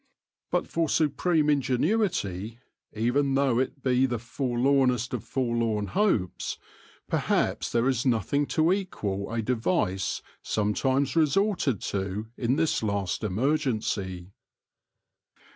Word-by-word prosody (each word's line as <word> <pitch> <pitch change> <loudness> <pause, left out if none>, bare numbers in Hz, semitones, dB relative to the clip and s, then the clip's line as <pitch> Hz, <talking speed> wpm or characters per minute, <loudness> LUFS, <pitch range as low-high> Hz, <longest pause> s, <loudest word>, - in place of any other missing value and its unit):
But - - 0
for 165 -2 0
supreme 155 +2 +2
ingenuity, 130 - 0 0.3
even 135 +5 +1
though 135 -3 +2
it 130 +1 -3
be 130 0 +3
the 120 -2 -2
forlornest 125 +1 +1
of - - -3
forlorn 115 -5 -1
hopes, 110 - 0 0.5
perhaps - - 0
there 120 +2 +2
is 130 -2 +1
nothing 130 +4 +1
to 160 +3 +3
equal 105 - -3
a 115 -1 -1
device 110 - 0 0.2
sometimes 130 +8 0
resorted 160 - +2
to 100 +2 -3
in 125 +2 0
this 160 +1 +1
last 100 -2 -1
emergency. 105 - -1
125 Hz, 110 wpm, -27 LUFS, 110-145 Hz, 0.5 s, be